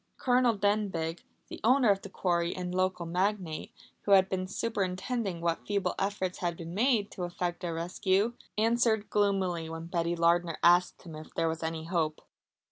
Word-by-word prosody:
Colonel 245 -3 +3
Denbigh, 195 -5 0 0.3
the - - -8
owner 245 -1 +5
of 195 0 0
the 200 - -9
quarry 175 -2 0
and 180 -1 -4
local 185 -1 0
magnate, 180 -1 -1 0.3
who 200 - +2
had 190 -1 +6
been 185 -1 -2
superintending 195 -1 -2
what 170 -1 -1
feeble 200 -3 0
efforts 195 -2 -2
had 170 -2 -2
been 165 0 -7
made 220 -1 +2
to 180 - -5
effect 175 0 -3
a 175 - -2
rescue, 190 +6 0 0.2
answered 225 -1 +2
gloomily 190 -5 +1
when 165 0 -6
Betty 170 0 -1
Lardner 170 0 +2
asked 175 +1 +4
him 170 -3 -10
if 155 0 -10
there 165 - +1
were 160 0 -3
any 160 0 -3
hope. 160 -3 -1
185 Hz, 170 wpm, -30 LUFS, 170-205 Hz, 0.3 s, had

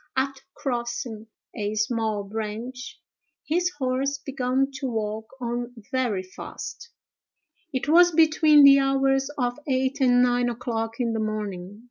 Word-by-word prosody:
After 270 +1 -1
crossing 240 -3 -4 0.3
a 210 -1 -3
small 215 -1 0
branch, 225 +4 -6 0.5
his 350 +3 +1
horse 270 +1 -1
began 270 0 -1
to 275 - -2
walk 220 -2 -3
on 240 0 -4 0.2
very 245 -8 0
fast. 185 - -9 0.8
It 260 0 -3
was 350 +3 +6
between 310 -2 +5
the 275 0 +9
hours 270 0 +2
of 245 0 -1
eight 265 +1 0
and 245 -1 +5
nine 245 0 +2
o'clock 230 -1 -3
in 235 -2 0
the 225 - -1
morning. 205 -3 -4
245 Hz, 130 wpm, -25 LUFS, 225-270 Hz, 0.8 s, the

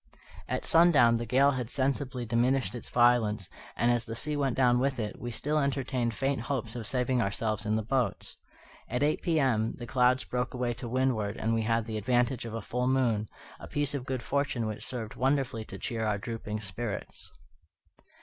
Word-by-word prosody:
At - - -2
sundown 155 -9 +5
the 120 0 -4
gale 135 +4 +4
had 125 -4 -3
sensibly 130 -2 -1
diminished 120 -1 +1
in 120 - -5
violence, 120 -5 +2 0.2
and, 120 +1 +2
as 120 -1 0
the 115 - -4
sea 150 +6 0
went 140 -4 0
down 125 -2 +4
with 135 0 0
it, 105 -2 -4
we 120 - -4
still 150 +6 0
entertained 130 -4 -1
faint 135 +2 0
hopes 120 -2 -3
of 115 -3 -5
saving 125 -1 +1
ourselves 110 +1 -1
in 110 - +2
the 110 - 0
boats. 125 -2 -1 0.5
At 125 +4 0
eight 150 +1 +1
P.M., 130 -10 +1
the 120 - -6
clouds 125 +1 +3
broke 125 +1 -3
away 125 -1 -1
to 120 0 -7
windward, 115 -5 0
and 115 +1 0
we 115 - +1
had 115 0 +1
the 110 -1 -4
advantage 120 +2 +1
of 115 -1 -5
a 115 - -4
full 125 +1 -1
moon, 120 -5 +1 0.3
a - - -9
piece 145 -1 0
of 135 -2 -4
good 130 -3 -2
fortune 140 -4 -1
which 110 -1 -4
served 115 -4 -4
wonderfully 130 -4 0
to 95 - -8
cheer 115 +2 -3
our 105 -2 +1
drooping 110 0 -5
spirits. 100 +2 -5
120 Hz, 195 wpm, -29 LUFS, 115-130 Hz, 0.5 s, sundown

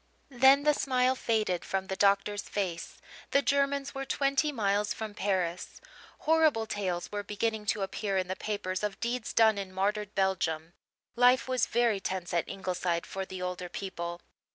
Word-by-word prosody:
Then 265 +2 +6
the 300 0 +4
smile 255 -2 +2
faded 215 -8 0
from 190 0 -2
the 190 - -3
doctor's 200 +1 +2
face; 180 -5 -4 0.3
the 280 - +3
Germans 280 0 +1
were 270 -1 -4
twenty 275 +2 +1
miles 205 -4 0
from 220 -2 -5
Paris. 185 -4 -2 0.4
Horrible 310 -8 +3
tales 190 -5 -3
were 205 0 -2
beginning 210 +1 -2
to 205 -1 +1
appear 195 0 -2
in 185 -1 0
the 185 - -3
papers 185 -3 -3
of 210 -1 -3
deeds 240 -1 -2
done 220 -2 +4
in 195 -1 -5
martyred 205 +2 -1
Belgium. 170 -4 0 0.4
Life 250 +2 +5
was 255 -1 +1
very 235 -3 +2
tense 185 -2 -4
at 170 - 0
Ingleside 180 -3 -2
for 190 0 -5
the 185 -1 -6
older 180 0 -4
people. 175 -3 -5
205 Hz, 165 wpm, -30 LUFS, 185-240 Hz, 0.4 s, Then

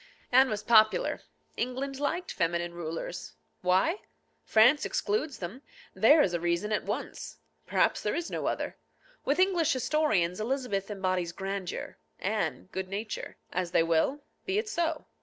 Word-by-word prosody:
Anne 260 +1 +6
was 215 -2 -3
popular. 220 -2 +4 0.3
England 265 +3 -3
liked 330 +5 -1
feminine 170 +1 -1
rulers. 165 - -5 0.3
Why? 190 - +3 0.5
France 240 +7 +5
excludes 410 -10 -1
them. 195 +9 -6 0.3
There 300 +1 +6
is 180 - 0
a 170 - 0
reason 175 +5 0
at 210 - 0
once. - - -5 0.3
Perhaps - - +2
there - - -1
is 345 0 -3
no - - -2
other. - - -2 0.5
With 285 - +2
English 360 -4 +3
historians 245 - +1
Elizabeth 220 -5 -1
embodies 185 -4 -1
grandeur, 195 -1 -5 0.2
Anne 90 - -2
good 190 0 -3
nature. 210 +2 -5 0.2
As 180 -1 -1
they 165 - +3
will. 165 - +1 0.3
Be 385 +1 +1
it 430 +1 0
so. 330 -5 -1
215 Hz, 145 wpm, -29 LUFS, 180-290 Hz, 0.5 s, Anne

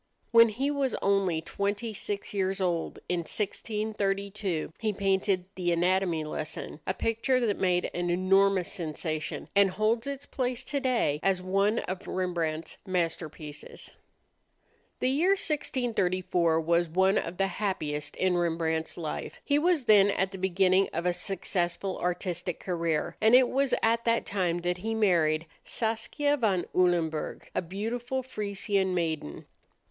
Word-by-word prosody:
When 230 -1 +8
he 265 +7 -1
was 280 -3 0
only 195 -5 +2
twenty 205 +6 -2
six 205 0 -3
years 195 -1 0
old, 175 -3 -1
in 180 - 0
1632, 200 -2 -2
he 215 -2 0
painted 195 -1 +1
the 180 -2 -1
"Anatomy 175 -1 +1
Lesson," 155 0 -5
a 185 - +1
picture 230 +5 +1
that 205 -3 0
made 180 -1 +2
an 175 0 -1
enormous 185 +1 +3
sensation, 155 -1 -4
and 200 -1 +6
holds 220 +5 0
its 280 0 -5
place 250 -2 -2
today 255 - 0
as 195 -2 +2
one 195 +4 +2
of 185 0 -6
Rembrandt's 170 -3 -2
masterpieces. 165 -5 -4 1.1
The 255 - +2
year 340 +8 +3
1634 185 - 0
was 170 +1 +1
one 190 +4 +3
of 170 +2 -5
the 195 - +2 0.2
happiest 150 -7 -2
in 185 -1 +1
Rembrandt's 165 -2 -1
life. 160 -3 -5
He 290 0 +3
was 330 -4 +2
then 205 -3 +6
at 190 -1 0
the 190 - -8
beginning 190 +1 +3
of 170 +2 -2
a 180 - +2
successful 180 0 -2
artistic 180 -1 -2
career, 170 -4 -1
and 220 +3 +6
it 255 -1 +6
was 275 -1 +2
at 230 +1 +2
that 230 0 +2
time 180 -3 -1
that 175 +1 -1
he 225 +4 -2
married 165 -7 +2 0.2
Saskia 235 +6 0
van 200 -8 +1
Ulenburg, 170 -4 +1
a - - 0
beautiful 230 +8 -3
Frisian 200 -5 -1
maiden. 160 - -2
190 Hz, 140 wpm, -28 LUFS, 175-220 Hz, 1.1 s, When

